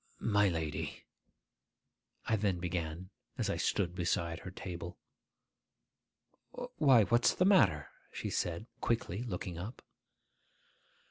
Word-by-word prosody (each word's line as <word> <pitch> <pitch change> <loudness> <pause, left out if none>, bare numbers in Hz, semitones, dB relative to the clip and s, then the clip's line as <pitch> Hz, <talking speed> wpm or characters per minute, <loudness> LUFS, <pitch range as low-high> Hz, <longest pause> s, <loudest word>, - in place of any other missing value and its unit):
'My 105 -2 +3
lady,' 80 -4 -3 1.2
I 110 - +2
then 100 -3 +1
began, 85 +1 -3 0.3
as - - 0
I - - -1
stood 90 -4 0
beside 85 -1 -1
her 95 - -7
table. 90 -2 -7 1.8
'Why, 135 -7 +6
what's 120 +3 +3
the 185 - +3
matter?' 100 - +4 0.2
she - - -4
said 85 +4 -1
quickly, 115 -4 -1
looking 90 -6 -4
up. 105 +8 -7
95 Hz, 110 wpm, -33 LUFS, 85-110 Hz, 1.8 s, Why